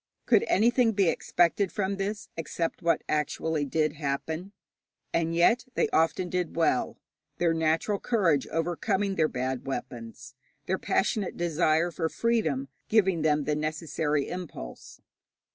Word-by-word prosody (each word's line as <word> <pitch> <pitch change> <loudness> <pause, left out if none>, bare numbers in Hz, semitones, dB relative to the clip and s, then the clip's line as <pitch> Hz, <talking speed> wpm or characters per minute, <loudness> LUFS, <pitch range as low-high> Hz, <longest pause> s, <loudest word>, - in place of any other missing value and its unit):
Could 405 - +4
anything 235 +2 +3
be 195 -4 +3
expected 175 +4 +1
from 200 -2 -1
this 205 +2 -3
except 165 +1 -3
what 170 -1 +1
actually 150 0 -1
did 155 +2 0
happen? 160 +5 -3 0.6
And 165 0 0
yet 230 +9 +4
they - - +2
often 165 +3 +1
did 180 -1 -2
well, 165 -6 +1 0.4
their 170 -1 +2
natural 165 +5 +1
courage 180 - +1
overcoming 180 +5 -1
their 160 -4 +2
bad 130 -1 -3
weapons, 125 -1 -6 0.3
their 190 +1 -1
passionate 195 -1 0
desire 170 0 +1
of 160 -2 -1
freedom 160 - 0 0.2
giving 190 -6 +3
them 150 -1 +2
the 150 +1 0
necessary 150 -1 -1
impulse. 175 - -8
165 Hz, 130 wpm, -28 LUFS, 150-190 Hz, 0.6 s, Could